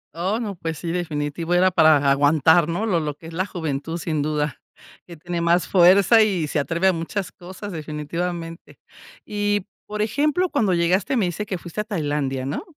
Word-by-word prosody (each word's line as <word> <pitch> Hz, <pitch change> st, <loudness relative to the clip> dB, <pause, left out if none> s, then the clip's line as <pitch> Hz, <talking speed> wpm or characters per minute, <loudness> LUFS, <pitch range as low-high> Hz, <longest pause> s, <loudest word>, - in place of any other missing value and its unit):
Oh, 190 Hz, +7 st, -1 dB
no, 210 Hz, -4 st, -4 dB
pues 165 Hz, -2 st, -5 dB
sí, 170 Hz, -2 st, -4 dB
definitivo, 165 Hz, 0 st, -2 dB
era 185 Hz, +1 st, +4 dB
para 155 Hz, -4 st, +5 dB
aguantar, 150 Hz, +4 st, +4 dB
¿no? 190 Hz, +7 st, -1 dB
Lo 180 Hz, -6 st, +1 dB
lo 150 Hz, -2 st, -3 dB
que -, -, -16 dB
es 165 Hz, -, -9 dB
la 185 Hz, +4 st, -1 dB
juventud, 160 Hz, -3 st, -4 dB
sin 155 Hz, -3 st, -2 dB
duda, 150 Hz, -1 st, -2 dB, 0.5 s
que 170 Hz, -2 st, -11 dB
tiene 175 Hz, +1 st, -4 dB
más 170 Hz, +1 st, +2 dB
fuerza 195 Hz, +5 st, +6 dB
y 190 Hz, -7 st, +1 dB
se 150 Hz, -, -1 dB
atreve 170 Hz, +5 st, -1 dB
a 190 Hz, -, +4 dB
muchas 175 Hz, +4 st, -4 dB
cosas, 190 Hz, +3 st, -9 dB
definitivamente. 165 Hz, +2 st, -5 dB, 0.5 s
Y, 205 Hz, -1 st, -1 dB, 0.2 s
por 210 Hz, 0 st, -2 dB
ejemplo, 300 Hz, +10 st, +1 dB
cuando 195 Hz, -5 st, +1 dB
llegaste 180 Hz, +9 st, +1 dB
me 210 Hz, -, +2 dB
dice 180 Hz, +4 st, -4 dB
que 185 Hz, -, -3 dB
fuiste 175 Hz, +5 st, -5 dB
a -, -, -4 dB
Tailandia, 145 Hz, -9 st, -2 dB
¿no? 140 Hz, -, -3 dB
170 Hz, 190 wpm, -22 LUFS, 155-190 Hz, 0.5 s, fuerza